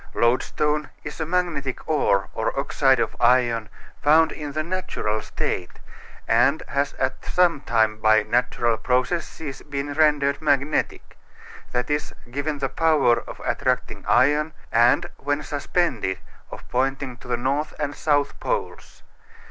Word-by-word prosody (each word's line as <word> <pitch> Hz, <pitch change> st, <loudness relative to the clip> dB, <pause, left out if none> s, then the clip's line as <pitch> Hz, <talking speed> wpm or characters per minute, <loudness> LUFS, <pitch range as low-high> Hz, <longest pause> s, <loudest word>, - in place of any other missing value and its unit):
Loadstone 150 Hz, +5 st, +1 dB
is 150 Hz, -, -7 dB
a 160 Hz, -, -2 dB
magnetic 165 Hz, -7 st, -2 dB
ore 100 Hz, -11 st, +2 dB
or -, -, -2 dB
oxide -, -, +2 dB
of -, -, -1 dB
iron 120 Hz, -3 st, +3 dB, 0.3 s
found 160 Hz, +2 st, +5 dB
in 150 Hz, -2 st, -6 dB
the 155 Hz, +1 st, -1 dB
natural 160 Hz, -11 st, -2 dB
state, 90 Hz, -1 st, -3 dB, 0.5 s
and 120 Hz, +7 st, +3 dB
has 140 Hz, +1 st, 0 dB
at 130 Hz, 0 st, -2 dB
some 175 Hz, -5 st, +2 dB
time 110 Hz, -2 st, +1 dB
by 110 Hz, 0 st, +4 dB
natural 120 Hz, -1 st, +1 dB
processes 135 Hz, +4 st, -2 dB
been 145 Hz, 0 st, -4 dB
rendered 145 Hz, -2 st, +2 dB
magnetic 145 Hz, 0 st, 0 dB, 0.5 s
that 125 Hz, 0 st, -1 dB
is, 150 Hz, 0 st, -2 dB, 0.2 s
given 145 Hz, +3 st, -2 dB
the 140 Hz, -1 st, -1 dB
power 145 Hz, -4 st, +3 dB
of -, -, -9 dB
attracting -, -, -1 dB
iron, 150 Hz, +3 st, +3 dB, 0.2 s
and, 120 Hz, +2 st, +4 dB
when 145 Hz, +2 st, -2 dB
suspended, 140 Hz, -, -1 dB, 0.3 s
of -, -, -10 dB
pointing 135 Hz, 0 st, -1 dB
to -, -, -14 dB
the 120 Hz, -1 st, 0 dB
North 140 Hz, +5 st, -1 dB
and 145 Hz, -1 st, -2 dB
South 145 Hz, -1 st, 0 dB
Poles. 480 Hz, -3 st, -4 dB
140 Hz, 135 wpm, -23 LUFS, 125-150 Hz, 0.5 s, found